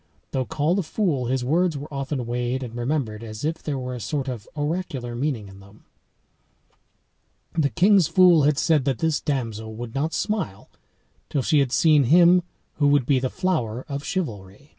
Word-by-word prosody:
Though 130 -1 -1
called 160 +5 0
a - - +2
fool, 155 - -1
his 130 0 -1
words 165 +3 +1
were 145 +1 -8
often 135 -2 -3
weighed 125 +2 -2
and 120 -2 -7
remembered 120 -3 -2
as 110 +3 -6
if 160 +1 -2
there 145 -3 -3
were 125 -1 -4
a 125 - -5
sort 140 +3 -3
of 120 -5 -6
oracular 145 -5 -3
meaning 120 -4 -2
in 95 0 -13
them.] 100 +2 -18 1.7
had 165 -2 +4
said 155 -5 +2
that 135 -4 0
this 160 +1 0
damsel 115 -6 -3
would 115 0 -7
not 150 +4 -1
smile 200 - -3 0.6
till 140 - -1
she 150 - +3
had 135 -3 +1
seen 150 -1 +4
him 175 +6 +6 0.4
who 145 -2 +3
would 145 -3 +3
be 135 -1 +3
the 130 0 -1
flower 130 - -2
of 140 -1 -4
chivalry. 115 - -5
140 Hz, 170 wpm, -24 LUFS, 120-160 Hz, 1.7 s, him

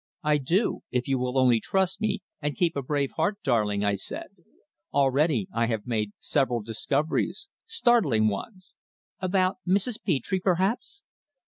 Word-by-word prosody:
"I 150 -1 +3
do 170 - +1
if 125 0 -1
you 135 -2 +1
will 125 +1 -1
only 125 -3 +5
trust 190 - 0
me, 215 -2 -1 0.2
and 150 -1 -2
keep 170 -2 +1
a 140 - -1
brave 140 +1 -1
heart, 205 0 +1
darling," 105 -5 +1
I 100 - +2
said. 100 - -5 0.6
"Already 140 - +2
I 115 0 +1
have 110 -3 -2
made 105 -4 -1
several 125 -6 0
discoveries 145 - -1 0.2
startling 230 - +3
ones." 185 - -5 0.5
"About 185 0 +1
Mrs. 205 +5 +1
Petre, 185 +2 0
perhaps?" 195 - 0
145 Hz, 145 wpm, -27 LUFS, 120-190 Hz, 0.6 s, only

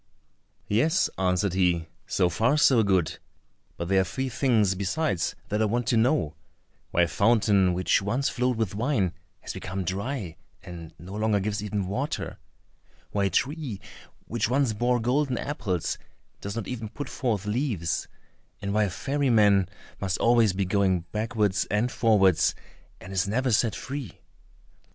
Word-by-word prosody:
"Yes," 155 - +2
answered 90 0 +1
he, 90 -3 +1 0.2
"so 90 - +2
far, 115 - +2
so 130 -5 +5
good; 95 -6 +1 0.6
but 85 - -4
there 95 +1 +4
are - - +2
three 130 +8 -3
things 110 -6 +2
besides 100 - -1
that 105 +1 0
I - - +4
want 120 +3 0
to - - +3
know: 110 - +2 0.6
why 85 - +3
a - - +2
fountain 100 -2 +3
which 95 +2 +2
once 120 +8 0
flowed 125 -1 0
with 110 -5 -1
wine 105 - 0 0.3
has - - -6
become 95 +1 -4
dry, 95 - -3 0.3
and 85 -3 -9
no 90 +3 -10
longer 105 0 +1
gives 105 +1 -2
even 105 -2 -2
water; 130 +10 -3 0.7
why 100 -1 +1
a - - +2
tree 140 - -1 0.5
which 115 -1 -1
once 130 -2 +2
bore 120 +3 +1
golden 130 +2 +1
apples 110 - -2 0.4
does 100 +1 -5
not 115 -4 -4
even 115 -4 -5
put 145 - -6
forth 110 -6 -2
leaves; 105 - -1 0.5
and 100 0 -3
why 105 0 +3
a - - -2
ferry 135 +8 -1
man 100 -5 +4 0.3
must 95 -2 -1
always 115 -3 +4
be 95 +1 -1
going 95 -2 +2
backwards 105 -2 0
and 110 +4 0
forwards, 100 -7 +3 0.4
and 95 - -9
is 95 +1 +1
never 125 +5 0
set 110 0 +2
free?" 135 -7 -6
105 Hz, 160 wpm, -26 LUFS, 95-120 Hz, 0.7 s, so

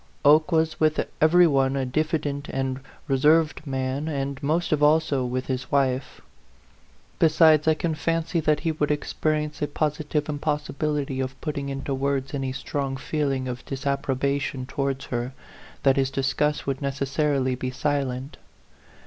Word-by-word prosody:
Oke 155 +4 +6
was 160 -1 +1
with 155 0 +2 0.2
every 175 +3 +6
one 135 -3 +2
a 135 -1 0
diffident 145 0 -1
and 135 0 -2 0.3
reserved 150 +4 +3
man, 135 +2 -2
and 140 -2 -3
most 160 +4 0
of 150 -1 +2
all 150 +2 +6
so 140 -4 -1
with 125 +1 -2
his 130 -1 -4
wife; 130 -2 0 1.0
besides, 160 -1 +5
I 160 - +5
can 165 +1 -1
fancy 165 +2 -1
that 155 -1 +1
he 165 - 0
would 150 -1 -1
experience 150 0 -1
a 150 - +1
positive 150 0 -1
impossibility 150 -2 -2
of 130 0 -3
putting 145 -3 -3
into 135 0 -3
words 135 0 -1
any 135 -2 -2
strong 135 0 -3
feeling 135 -2 -1
of 125 -1 -5
disapprobation 140 -1 -1
towards 135 0 -2
her, 120 +2 -2 0.5
that 135 -1 +4
his 135 -1 +2
disgust 140 +2 0
would 135 0 -2
necessarily 140 -1 0
be 130 0 -3
silent. 135 0 -2
140 Hz, 150 wpm, -25 LUFS, 135-155 Hz, 1.0 s, Oke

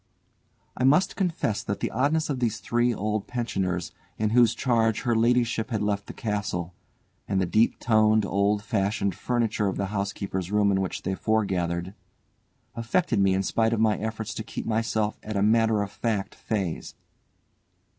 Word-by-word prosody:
I - - -2
must 145 +8 +4
confess 170 - -1
that 100 - -4
the - - -2
oddness 150 +6 +1
of 140 -4 -2
these 120 -4 0
three 120 +1 +1
old 105 -1 -2
pensioners 95 -8 -2 0.3
in 105 0 0
whose 120 -1 +4
charge 115 -3 +1
her 120 -2 +1
ladyship 115 0 +2
had 110 -4 -1
left 100 -1 -1
the - - -7
castle, 100 -5 -3 0.5
and 95 -1 0
the 95 - +2
deep 110 +6 +2
toned, 110 -2 +3
old 100 +2 +1
fashioned 100 -3 0
furniture 115 0 0
of 95 - -2
the 100 - -1
housekeeper's 100 -2 -3
room 105 -1 +3
in 95 0 +1
which 95 - -4
they 95 - -1
foregathered, 95 -4 -1 0.8
affected 115 - 0
me 95 -1 +3
in 95 - 0
spite 110 +4 +1
of 115 - 0
my 110 -1 +3
efforts 110 0 -4
to 110 - -5
keep - - -6
myself 110 -1 -1
at 110 -1 -4
a 100 - +2
matter 110 -1 +3
of 100 - -6
fact 105 -4 -2
phase. 95 -7 -3
110 Hz, 170 wpm, -26 LUFS, 100-115 Hz, 0.8 s, must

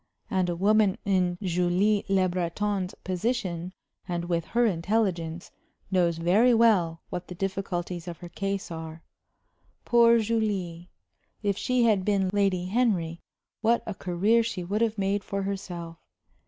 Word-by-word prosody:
And 185 -2 +1
a 175 - -1
woman 205 +1 +3
in 180 -3 +1
Julie 180 +3 +2
Le 190 -1 +3
Breton's 185 +2 -2
position, 185 -3 -2 0.4
and 175 -2 -2
with 170 -2 -1
her 240 +1 +1
intelligence, 180 -3 -1 0.4
knows 175 -3 +2
very 205 +9 +4
well 185 -8 +3
what 180 0 -5
the 180 - -8
difficulties 180 -2 -3
of 170 -1 -6
her 175 - -10
case 195 0 -3
are. 160 0 -7 0.8
Poor 235 -1 +6
Julie! 205 -6 -1 0.5
If 200 -1 +1
she 250 +4 +1
had 215 -5 +3
been 195 -2 +1
Lady 195 -3 +1
Henry, 185 -6 0 0.4
what 230 +1 +2
a 215 - -4
career 195 +6 +2
she 225 -5 -3
would 205 +5 -2
have 225 -1 +1
made 200 0 0
for 200 +1 -3
herself! 175 -4 -5
190 Hz, 140 wpm, -27 LUFS, 175-210 Hz, 0.8 s, Poor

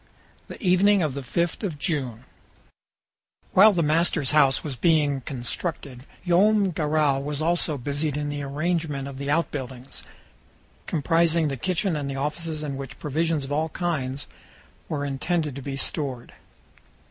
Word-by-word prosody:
THE - - -9
EVENING 190 +1 +4
OF 150 -4 -1
THE 140 - -4
FIFTH 170 +7 -1
OF 175 -7 -2
JUNE 130 - -2 1.3
While 210 +4 +8
the 175 -4 +1
master's 155 -2 +2
house 140 -3 +4
was 145 -4 -4
being 145 0 +2
constructed, 130 +1 -5 0.2
Joam 195 +2 +4
Garral 150 -3 +1
was 145 0 -3
also 160 -2 +1
busied 145 +3 -2
in 145 0 -2
the 145 0 -3
arrangement 150 0 -2
of 135 -1 -8
the 140 0 -3
out 165 +3 +1
buildings, 130 -2 -6 0.9
comprising 165 +1 +2
the 135 - -2
kitchen, 185 - 0
and 140 -2 -3
offices 155 +2 -2
in 140 -2 -3
which 135 -2 -7
provisions 155 +1 0
of 135 - -7
all 155 +2 0
kinds 145 -6 -2 0.6
were 145 -2 -2
intended 150 +1 -1
to 140 - -6
be 135 0 -5
stored. 135 -4 -2
150 Hz, 145 wpm, -25 LUFS, 140-165 Hz, 1.3 s, While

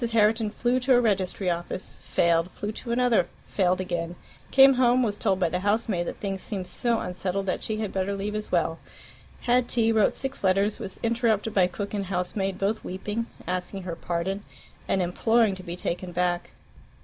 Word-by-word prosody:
Herriton 220 0 +3
flew 245 +4 +1
to 255 0 +4
a - - +6
registry 195 -4 0
office, 175 +2 -4
failed; 170 0 +2
flew 210 - -4
to 235 +2 -6
another, 235 -7 +3 0.2
failed 185 -2 +1
again; 175 -2 -3 0.3
came 270 0 +8
home, 250 0 +4
was 210 -3 0
told 195 -3 +1
by 175 -3 +2
the 180 - -1
housemaid 205 -3 0
that - - -4
things 195 -2 -3
seemed 195 -4 -4
so 235 +5 0
unsettled 185 +2 -3
that 185 - -1
she 220 - -3
had 215 -2 -3
better 195 +1 -1
leave 200 +1 -3
as 215 0 -4
well; 165 -2 +1 0.6
had 245 0 +2
tea, 225 -2 +3
wrote 220 -2 +3
six 270 -3 -5
letters, 195 +2 +2
was 190 - -6
interrupted 230 -2 +1
by 185 -2 +4
cook 200 +3 -5
and 200 -2 -2
housemaid, 190 +1 -2
both 205 +3 -1
weeping, 210 +5 -3 0.2
asking 185 +2 -3
her 175 -2 -4
pardon, 175 +4 -2 0.4
and 190 - +2
imploring 225 +4 +2
to 190 - -7
be 175 -1 -6
taken 180 0 -3
back. 175 0 0
195 Hz, 185 wpm, -26 LUFS, 180-225 Hz, 0.6 s, came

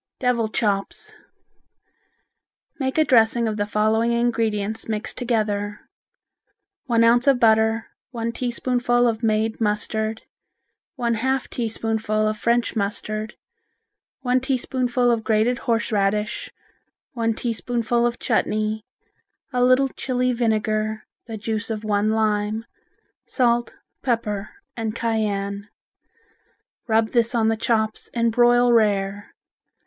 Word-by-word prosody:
Devil 245 -3 +1
Chops 215 - -2 1.7
Make 265 0 -2
a 315 - +5
dressing 230 -2 +4
of 215 -1 -2
the 205 0 -1
following 220 +2 +1
ingredients 225 -3 -1
mixed 215 0 -3
together: 210 -4 -1 1.0
One 230 -3 +3
ounce 240 +3 +4
of 270 -3 +5
butter, 220 -1 +3 0.2
one 230 -2 -3
teaspoonful 245 0 0
of 225 -1 -1
made 220 0 0
mustard, 220 +1 -1 0.7
one 240 -3 0
half 265 +4 -1
teaspoonful 220 -2 -1
of 215 - 0
French 235 +3 0
mustard, 215 +1 -2 0.9
one 250 -1 +2
teaspoonful 250 -1 0
of 230 -2 0
grated 225 +3 +1
horseradish, 210 -2 0 0.6
one 230 -2 0
teaspoonful 235 0 -1
of 240 0 0
chutney, 215 -2 -1 0.7
a 250 0 +2
little 255 +2 +4
Chili 250 -1 -1
vinegar, 215 -2 -1 0.2
the 225 -2 -5
juice 215 +1 -3
of 220 -1 -4
one 210 0 +1
lime, 215 0 0 0.6
salt, 240 -2 +1 0.3
pepper 215 -5 -1 0.3
and 225 -1 -3
cayenne. 205 -3 -2 1.2
Rub 220 -1 +2
this 235 0 +2
on 225 -1 +3
the 225 - +1
chops 220 -1 -1
and 230 -1 +2
broil 240 +1 +4
rare. 205 -2 +1
225 Hz, 115 wpm, -23 LUFS, 215-240 Hz, 1.7 s, a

